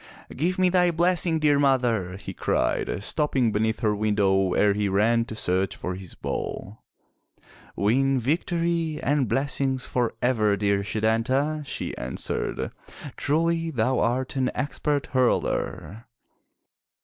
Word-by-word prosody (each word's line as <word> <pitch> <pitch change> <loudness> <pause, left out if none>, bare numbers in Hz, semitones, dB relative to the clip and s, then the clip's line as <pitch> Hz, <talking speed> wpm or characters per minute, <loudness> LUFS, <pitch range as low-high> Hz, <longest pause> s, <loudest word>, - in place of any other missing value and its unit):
"Give 175 +6 0
me 185 -1 +4
thy 180 -1 +3
blessing, 170 0 +1
dear 150 -2 +3
mother!" 120 -9 +1
he - - -8
cried, - - -1
stopping 135 -4 +1
beneath 110 +2 0
her 105 -3 +2
window 100 -3 +2
ere 105 -1 +4
he 105 0 0
ran 115 +4 +2
to 110 - -7
search 95 -2 0
for 90 - -4
his 90 -1 -9
ball. 100 +4 -5 0.9
"Win 130 +6 +2
victory 165 +3 -1
and 140 -3 +1
blessings 135 -1 0
forever, 115 -3 0
dear 100 0 +1
Setanta," 120 +9 0
she - - -5
answered. 60 +1 -3 0.4
"Truly 165 +2 0
thou 130 -2 0
art 130 +3 0
an 130 -1 +1
expert 145 0 -1
hurler!" 120 -3 -1
125 Hz, 125 wpm, -25 LUFS, 105-150 Hz, 0.9 s, me